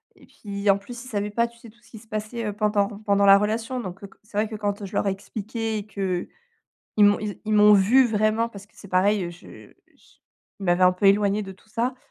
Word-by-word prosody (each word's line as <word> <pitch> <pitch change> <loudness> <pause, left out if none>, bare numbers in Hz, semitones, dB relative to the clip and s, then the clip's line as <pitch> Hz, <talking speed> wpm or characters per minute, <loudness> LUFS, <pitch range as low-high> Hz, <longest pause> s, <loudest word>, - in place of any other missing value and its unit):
et - - -19
puis, 200 -1 -7
en 195 - +2
plus, 235 +4 -10
ils - - -11
savaient 210 -3 -2
pas, 235 +3 +1
tu 235 0 -19
sais, 230 - -13
tout 220 - -22
ce - - -22
qui 220 - -10
se 225 - -19
passait, 215 +2 -4
heu, 210 - -2
pendant 210 -1 +1 0.2
pendant 200 0 +3
la 195 0 +8
relation. 225 +5 -2
Donc, 190 -3 -7
heu, - - -6
co - - -23
c'est 210 -1 -9
vrai 215 - +2
que, 215 - -7
quand 205 -1 -3
je 195 - -8
leur - - 0
ai - - +2
expliqué 220 +3 -4
et 205 - -5
qu'ils 190 -4 -3 0.8
m'ont 205 0 +4
ils 210 -2 -5
ils 215 - 0
m'ont 210 0 +7
vue 220 +7 +5
vraiment, 220 +1 +1
parce 200 -3 -12
que, 210 - -34
c'est 200 - -13
pareil, 185 -1 +1
je 175 - -14 0.2
j - - -27 0.4
il 195 - -6
m'avait 175 +1 +3
un 180 - +6
peu 180 +2 -2
éloignée 200 +1 +3
de 195 - -8
tout 205 +3 -25
ça. 245 +2 -1
210 Hz, 260 wpm, -24 LUFS, 200-220 Hz, 0.8 s, la